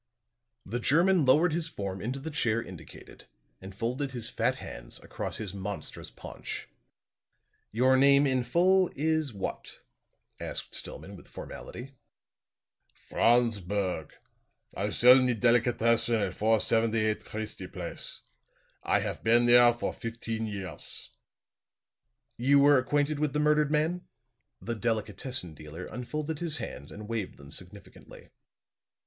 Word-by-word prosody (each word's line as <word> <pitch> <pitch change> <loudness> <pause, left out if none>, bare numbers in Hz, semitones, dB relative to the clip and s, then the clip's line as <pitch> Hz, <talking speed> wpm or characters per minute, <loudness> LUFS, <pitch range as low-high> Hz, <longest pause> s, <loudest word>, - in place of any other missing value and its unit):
The 120 +5 -3
German 165 +6 +4
lowered 150 +6 +4
his 165 0 0
form 100 - -5
into 130 +5 -3
the 160 +4 -6
chair 115 -6 +1
indicated 90 -7 -11 0.3
and 95 0 -10
folded 130 +6 -2
his 120 -2 -2
fat - - 0
hands - - -9
across - - -4
his 105 -4 -5
monstrous 100 +1 -6
paunch. - - -8 1.0
"Your 130 +4 +4
name 140 +1 +6
in 130 -2 +1
full 180 +8 +3
is 155 -1 0
what?" 100 -3 -6 0.6
asked - - -4
Stillman - - -6
with - - -14
formality. 130 +3 -9 1.0
"Franz 120 -2 +2
Berg. 90 -4 -3 0.6
I - - -1
sell 125 +2 +7
me 125 -1 +2
delicatessen 115 0 +3
at 100 -5 0
478 110 0 +2
Christie 110 0 -6
Place. - - -5 0.6
I - - +2
haf - - -4
been 120 +2 +4
there 120 0 +7
for 120 - -3
fifteen 115 -1 -4
years." 95 -6 -6 1.3
"You 135 +4 +4
were 140 -1 +6
acquainted 145 +3 0
with 150 -2 0
the 150 - 0
murdered 150 -1 +3
man?" 160 +4 0 0.5
The 115 - -4
delicatessen 110 -2 -2
dealer 75 +4 -9
unfolded 150 +6 -4
his 165 -3 -2
hands 75 - -7
and 105 0 -9
waved 110 -4 -4
them 70 +1 -13
significantly. 90 +4 -12
120 Hz, 130 wpm, -29 LUFS, 105-140 Hz, 1.3 s, sell